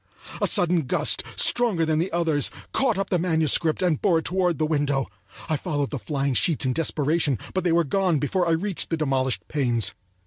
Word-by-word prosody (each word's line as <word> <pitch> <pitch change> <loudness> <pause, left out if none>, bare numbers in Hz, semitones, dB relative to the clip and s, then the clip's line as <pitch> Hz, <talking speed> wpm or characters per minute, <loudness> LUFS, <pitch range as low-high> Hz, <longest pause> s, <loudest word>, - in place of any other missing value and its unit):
A - - +4
sudden 170 -5 +1
gust, - - +1
stronger 225 -9 +2
than 155 -1 +1
the 175 +4 -1
others, 165 -4 0 0.2
caught 250 -7 +1
up 195 0 -3
the 180 - +2
manuscript 160 0 +1
and 170 -5 +1
bore 180 -5 +3
it 160 - -3
toward 180 -2 0
the 155 - +1
window. 145 -3 0 0.4
I 155 - 0
followed 145 -3 -2
the 140 - -3
flying 140 0 -2
sheets 155 +3 +1
in 130 - +1
desperation, 150 -2 0 0.2
but 185 - -1
they 175 - +1
were 170 +1 +3
gone 180 +2 +1
before 175 +6 0
I 165 - +2
reached 190 +3 -2
the 165 - -1
demolished 135 -4 -1
panes. 120 -9 0
160 Hz, 200 wpm, -24 LUFS, 145-180 Hz, 0.4 s, A